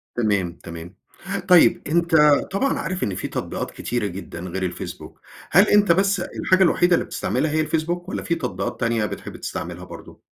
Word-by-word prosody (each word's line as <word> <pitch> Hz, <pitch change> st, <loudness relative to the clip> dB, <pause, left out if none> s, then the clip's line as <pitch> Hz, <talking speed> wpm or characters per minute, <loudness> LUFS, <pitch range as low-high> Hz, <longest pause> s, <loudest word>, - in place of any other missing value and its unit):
تمام، 100 Hz, -7 st, 0 dB
تمام. 85 Hz, +2 st, -9 dB, 0.5 s
طيب 180 Hz, -2 st, +6 dB
أنت 170 Hz, +1 st, +2 dB, 0.4 s
طبعًا 275 Hz, +8 st, 0 dB
عارف 185 Hz, 0 st, -3 dB
إن 100 Hz, -, -1 dB
في -, -, -4 dB
تطبيقات -, -, -4 dB
كتيرة 120 Hz, -3 st, -3 dB
جدًا 95 Hz, -2 st, -7 dB
غير 95 Hz, +1 st, -5 dB
الفيسبوك، 90 Hz, -1 st, -6 dB, 0.3 s
هل 190 Hz, +6 st, +6 dB
أنت 205 Hz, -4 st, +5 dB
بس 195 Hz, +2 st, +2 dB
الحاجة 185 Hz, +1 st, +1 dB
الوحيدة 175 Hz, 0 st, +4 dB
اللي -, -, +1 dB
بتستعملها 155 Hz, -, -1 dB
هي 155 Hz, +1 st, +1 dB
الفيسبوك، 170 Hz, +3 st, -2 dB
والَّا -, -, -4 dB
في 170 Hz, -, 0 dB
تطبيقات 145 Hz, -7 st, -4 dB
تانية 115 Hz, -2 st, +1 dB
بتحب -, -, -7 dB
تستعملها -, -, -6 dB
برضه؟ -, -, -12 dB
155 Hz, 170 wpm, -22 LUFS, -, 0.5 s, طيب